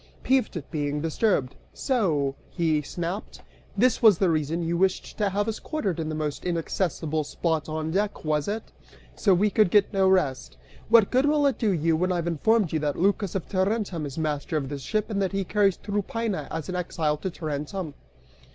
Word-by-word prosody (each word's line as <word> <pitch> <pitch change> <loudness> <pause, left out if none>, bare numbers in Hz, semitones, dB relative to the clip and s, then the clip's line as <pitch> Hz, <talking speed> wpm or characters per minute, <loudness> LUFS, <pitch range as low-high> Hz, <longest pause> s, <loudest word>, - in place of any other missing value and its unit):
Peeved 255 -7 +1
at 150 - -8
being 145 -1 -1
disturbed, 160 - 0 0.2
"So," 165 - +1 0.2
he 160 -4 +1
snapped, 175 +7 -5 0.3
"this 245 +4 +3
was 215 -6 +7
the 185 -2 +2
reason 160 +2 -1
you 165 +1 -1
wished 190 +2 0
to 205 -2 +2
have 205 +2 -1
us 225 - -2
quartered 200 - -2
in 160 -1 -2
the 155 - -3
most 150 -2 -3
inaccessible 165 -2 -1
spot 160 +1 -2
on 155 0 -3
deck, 200 -1 -1
was 150 -1 0
it? 215 +2 -4 0.4
So 195 -4 +3
we 205 +3 +2
could 215 -3 +4
get 205 +2 +3
no 190 -1 +3
rest! 150 -9 0 0.3
What 225 -3 +6
good 260 +3 +3
will 295 -1 +3
it 275 -5 +1
do 220 - +2
you 165 -2 +2
when 180 +3 0
I've 175 -2 -1
informed 175 +4 +2
you 160 - +1
that 145 -1 -1
Lycas 200 +1 +1
of 190 - -3
Tarentum 190 -4 -1
is 140 - -9
master 155 0 -1
of 135 -3 -3
this 140 -1 -5
ship 215 - -2
and 200 -1 0
that 195 0 -1
he 195 0 0
carries 200 0 +2
Tryphaena 205 -4 -2
as 160 -2 -4
an 185 - -4
exile 160 -4 -1
to 190 - -3
Tarentum?" 155 +1 -4
180 Hz, 195 wpm, -26 LUFS, 155-205 Hz, 0.4 s, was